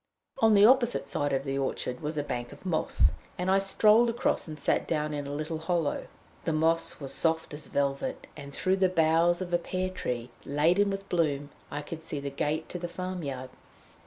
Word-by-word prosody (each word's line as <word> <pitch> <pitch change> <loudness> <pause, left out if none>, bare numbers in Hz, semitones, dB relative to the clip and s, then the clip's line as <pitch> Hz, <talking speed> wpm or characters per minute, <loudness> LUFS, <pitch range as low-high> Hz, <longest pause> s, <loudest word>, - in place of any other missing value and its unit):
On 220 -3 +5
the 200 +1 +8
opposite 245 0 +4
side 145 0 -1
of 135 0 0
the 135 0 -2
orchard 125 -2 -2
was 155 +1 -4
a 145 - 0
bank 120 -3 -4
of 145 +6 -14
moss, 175 -4 +2 0.3
and 180 +1 0
I 195 - +5
strolled 215 +4 +5
across 230 -5 0
and 155 -1 -7
sat - - +1
down 150 -2 -1
in 145 -1 -3
a - - -5
little 155 +2 -3
hollow. 165 -2 -1 0.4
The 165 - 0
moss 165 +2 +1
was 140 -2 -4
soft 160 -2 +1
as 150 0 -2
velvet, 140 -1 -1
and 140 -2 -9
through 185 +6 +1
the 190 -1 +3
boughs 170 +1 +3
of 175 -1 -7
a 175 - +4
pear 185 +1 -2
tree, 125 -9 -4
laden 170 +8 +3
with 195 0 -4
bloom, 145 -5 0 0.2
I 145 +1 -4
could 160 +2 -7
see 160 -2 -5
the 140 0 -4
gate 150 +3 -1
to 180 - -5
the 175 - -3
farm 185 +1 -5
yard. 130 -3 -5
160 Hz, 210 wpm, -29 LUFS, 145-185 Hz, 0.4 s, the